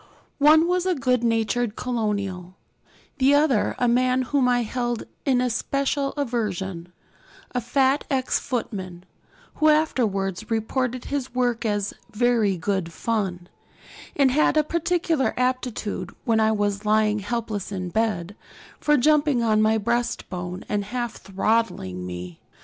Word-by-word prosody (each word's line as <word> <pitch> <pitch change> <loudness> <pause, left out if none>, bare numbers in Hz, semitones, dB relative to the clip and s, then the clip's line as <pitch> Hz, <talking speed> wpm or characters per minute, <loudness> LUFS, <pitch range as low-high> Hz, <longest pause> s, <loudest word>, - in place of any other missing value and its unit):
One 310 +3 +6
was 360 0 +1
the 370 -1 +2
good 255 -3 +1
natured 230 0 0
colonial; 200 -7 -3 0.6
the 270 +2 +5
other 285 -7 +2
a 245 - +1
man 255 +2 +2
whom 260 0 +1
I 245 -1 +2
held 240 0 -2 0.2
in 260 -3 +3
especial 275 +3 -1
aversion, 195 - -3 0.6
a 250 - -1
fat 265 +4 +2
ex 260 -2 +1
footman, 190 -7 -4 0.5
who 310 - +4
afterwards 220 - +1
reported 240 +3 -1
his 270 -3 -4
work 245 -2 0
as 205 -1 -1 0.2
'very 225 -4 +2
good 180 0 -2
fun,' 190 -4 -2 0.7
and 275 -2 +4
had 305 +2 +3
a 305 - +5
particular 335 -2 0
aptitude, 250 -7 -2
when 225 -3 +2
I 220 0 +3
was 205 -1 -1
lying 215 0 +2
helpless 210 -1 -3
in 185 -2 -4
bed, 205 -2 -1 0.4
for 295 -1 +3
jumping 290 -2 +3
on 215 -1 +3
my 220 +1 +3
breastbone 195 -5 -2
and 205 -1 -1
half 240 +1 -4
throttling 195 - -1
me. 90 -1 -7
235 Hz, 135 wpm, -24 LUFS, 205-260 Hz, 0.7 s, One